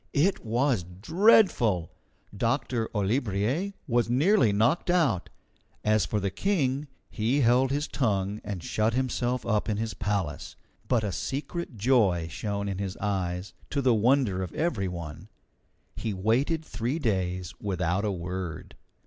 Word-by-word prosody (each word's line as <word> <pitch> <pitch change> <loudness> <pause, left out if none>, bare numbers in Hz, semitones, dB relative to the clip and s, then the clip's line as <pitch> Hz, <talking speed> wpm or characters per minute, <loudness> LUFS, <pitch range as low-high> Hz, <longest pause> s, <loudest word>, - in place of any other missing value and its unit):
It 185 +7 +2
was 120 0 +1
dreadful! 110 - +3 0.4
Doctor 115 +1 0
Olibriers 110 - 0
was 120 -3 +1
nearly 145 - +4
knocked 115 - +2
out. 150 - +2 0.5
As 105 -4 +2
for 105 - 0
the 100 -1 -1
King, 145 - 0 0.2
he 120 +6 +1
held 125 +2 +4
his 145 +3 -1
tongue 105 -4 -1
and 100 -5 -5
shut 110 +2 0
himself 125 -1 -1
up 110 -1 0
in 105 - 0
his 110 0 -2
palace, 95 -5 -3 0.3
but 120 -4 +2
a 105 - -1
secret 140 - -4
joy 100 -8 +3
shone 100 -1 -3
in 100 -1 -3
his 95 -2 -4
eyes, 90 -2 -2 0.2
to 145 - -1
the 130 -3 +4
wonder 115 -3 +2
of 90 -3 -4
every 135 - 0
one. 85 +1 -7 0.7
He 110 -3 -3
waited 130 - +1
three 125 +4 -2
days 95 - -1
without 95 -1 0
a 105 - 0
word. 90 -2 -5
110 Hz, 140 wpm, -27 LUFS, 95-130 Hz, 0.7 s, nearly